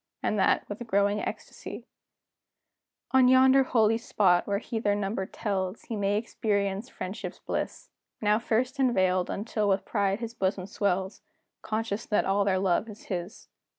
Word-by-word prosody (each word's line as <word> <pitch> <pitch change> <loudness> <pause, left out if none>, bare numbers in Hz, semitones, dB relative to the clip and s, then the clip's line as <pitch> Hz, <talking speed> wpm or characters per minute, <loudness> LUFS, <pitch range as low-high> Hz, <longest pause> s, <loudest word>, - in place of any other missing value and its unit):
And 210 - 0
that, 190 - +2
with 225 +3 -7
growing 200 0 +2
ecstacy, - - -7 1.3
On 260 -1 +6
yonder 260 +1 +6
holy 225 -3 +2
spot, 190 -7 +2
when 200 -1 0
he 225 0 -4
their 205 -2 +1
number 195 -1 -2
tells, 195 -2 -3
He 230 - -5
may 205 0 +1
experience 205 0 -1
friendship's 190 +4 -6
bliss, - - -4 0.3
Now 210 0 +2
first 245 +4 -1
unveiled, 185 -8 +2
until 210 0 -1
with 195 0 +1
pride 200 -1 0
his 230 -1 -5
bosom 190 -3 -1
swells, 190 -2 -1 0.4
Conscious 220 0 -3
that 210 - +2
all 195 +1 +2
their 190 -2 +2
love 190 +3 +1
is 210 - -11
his. 180 +3 -6
205 Hz, 150 wpm, -28 LUFS, 195-225 Hz, 1.3 s, On